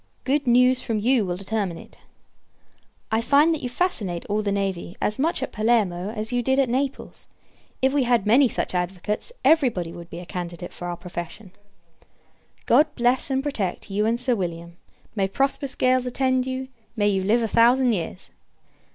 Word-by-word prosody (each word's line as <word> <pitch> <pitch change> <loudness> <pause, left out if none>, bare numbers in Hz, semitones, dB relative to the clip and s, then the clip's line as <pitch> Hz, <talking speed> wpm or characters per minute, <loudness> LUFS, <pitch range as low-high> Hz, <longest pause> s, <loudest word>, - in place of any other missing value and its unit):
Good 285 +1 0
news 250 +1 +5
from 225 -3 -2
you 235 +2 +2
will 175 0 -2
determine 195 -3 -2
it. - - -14 1.1
I 220 +1 +2
find, 290 +7 +4
that 315 - -4
you 250 - -3
fascinate 215 - -2
all 210 +1 -1
the 205 -1 -1
navy 195 -3 -3
as 210 - -1
much 310 -1 0
at - - -4
Palermo 210 -5 +1
as 220 +1 -4
you 245 - +1
did 265 +2 +1
at 270 -3 +2
Naples. 270 +2 -3 0.6
If 265 +1 +3
we 290 - +2
had 240 -4 +2
many 250 +6 +5
such 225 - -3
advocates, 185 - -3
every 315 -5 +5
body 175 -7 -5
would 170 -1 -10
be 170 - -8
a 175 - -8
candidate 175 0 -6
for 175 - -7
our 175 -1 -4
profession. 180 +3 -8 1.1
God 305 - +5
bless, 245 +3 +1
and 265 0 0
protect, 210 -9 -3
you 210 +2 +1
and 230 +1 0
Sir 250 0 +1
William. 170 -3 -5 0.4
May 195 -2 +1
prosperous 275 +5 -1
gales 255 0 +2
attend 260 0 0
you! 260 0 -4 0.3
May 205 -2 +2
you 195 -1 +1
live 225 +5 +2
a - - +1
thousand 240 +3 +4
years! 180 0 -5
225 Hz, 185 wpm, -24 LUFS, 190-260 Hz, 1.1 s, news